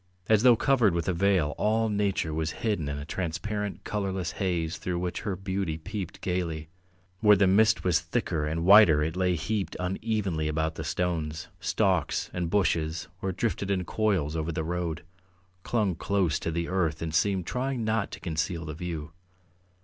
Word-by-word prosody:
As 110 -1 +4
though 125 -1 +7
covered 115 -6 +3
with 85 - -1
a 90 - +2
veil 90 -4 +2
all 110 +1 +2
nature 100 -6 0
was 80 0 -1 0.2
hidden 100 -10 0
in 70 - -3
a 70 - -6
transparent, 100 +5 -3
colourless 95 -4 -2
haze 85 -2 -1
through 90 -1 -3
which 90 0 -2
her 100 - -2
beauty 95 -3 -2
peeped 95 +2 -6
gaily; 85 -4 -2 0.5
where 105 -1 +6
the 100 0 +4
mist 110 +4 +4
was 85 -3 +3
thicker 75 -1 -2
and 80 +2 -2
whiter 95 -7 +8
it 80 +2 -2
lay 90 -1 +2
heaped 100 +4 -2
unevenly 95 -3 -1
about 80 +1 -1
the 80 - -6
stones, 80 -2 -2
stalks, - - 0
and 90 -2 -2
bushes 80 -5 0
or 95 - -1
drifted 100 +1 -2
in 95 -2 0
coils 95 -8 0
over 80 +1 -1
the 80 0 -2
road, 85 -1 -3 0.6
clung 105 -3 0
close 95 -3 0
to - - -3
the 85 +1 -2
earth 85 -4 0
and 80 -1 -4
seemed 95 +1 +1
trying 125 0 -2
not 110 +1 0
to - - -8
conceal 85 0 -2
the 75 - -5
view. 80 -2 -5
90 Hz, 175 wpm, -28 LUFS, 80-100 Hz, 0.6 s, whiter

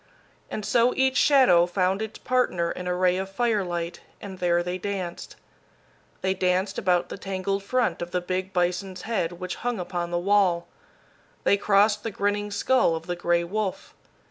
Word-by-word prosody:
And 210 - -4
so 240 +1 +3
each 265 0 +2
shadow 250 -12 +5
found 185 +2 0
its 220 0 -5
partner 185 -10 0
in 180 - -6
a 180 - 0
ray 180 0 +2
of 190 0 -3
firelight, 195 -6 -1 0.2
and 190 -2 -9
there 175 -1 +2
they 180 +1 -3
danced. 185 -3 -5 0.9
They 190 0 +1
danced 185 +1 0
about 180 -2 +1
the - - -7
tangled 195 0 -2
front 230 -4 0
of 175 - -4
the 180 - -1
big 185 +1 -3
bison's 180 +1 -1
head 200 -7 -1
which 180 +1 -6
hung 245 -2 -2
upon 175 -1 -3
the 175 - -1
wall. 185 -2 +2 0.8
They - - +4
crossed 205 +1 +3
the 225 - -3
grinning 205 0 -1
skull 215 -3 +2
of 165 0 -6
the 175 0 -3
gray 175 0 +1
wolf. 200 +2 -3
185 Hz, 170 wpm, -25 LUFS, 175-205 Hz, 0.9 s, shadow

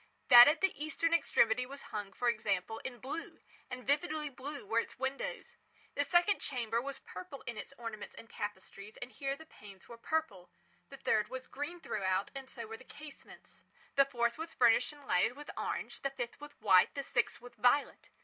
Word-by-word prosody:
That 240 -1 +12
at 305 +2 +3
the 385 -1 +3
eastern 330 +2 0
extremity 245 -7 +3
was 280 +1 -10
hung, 205 -2 -3
for 245 +5 -2
example 215 -2 0
in 255 -2 -6
blue—and 255 -1 -8
vividly 300 +2 0
blue 280 0 -7
were 225 +3 +2
its - - -5
windows. 265 +1 -4 0.4
The 285 - +1
second 350 +6 +3
chamber 235 -3 -1
was 275 +1 -5
purple 185 +10 -9
in 235 - -4
its - - -7
ornaments 225 -3 -7
and 230 - -10
tapestries, 205 0 -7
and 245 - -7
here 275 0 -3
the 320 +3 -13
panes 200 -9 -14
were 235 -1 -11
purple. 230 - -2 0.4
The - - -10
third 210 -1 +2
was 260 +2 -6
green 290 +6 -5
throughout, 190 - -1
and 270 -1 -8
so 235 -3 -6
were 225 +1 -7
the 255 - -15
casements. 295 +2 -13 0.3
The 275 - +6
fourth 235 -1 0
was 325 0 -5
furnished 235 +4 +5
and 290 -1 -15
lighted 225 +3 +2
with 295 - -8
orange—the 275 - -3
fifth 250 -1 -6
with 295 0 -11
white—the 190 +10 +4
sixth 240 - 0
with 245 +1 -12
violet. 245 +5 +2
250 Hz, 185 wpm, -34 LUFS, 220-285 Hz, 0.4 s, That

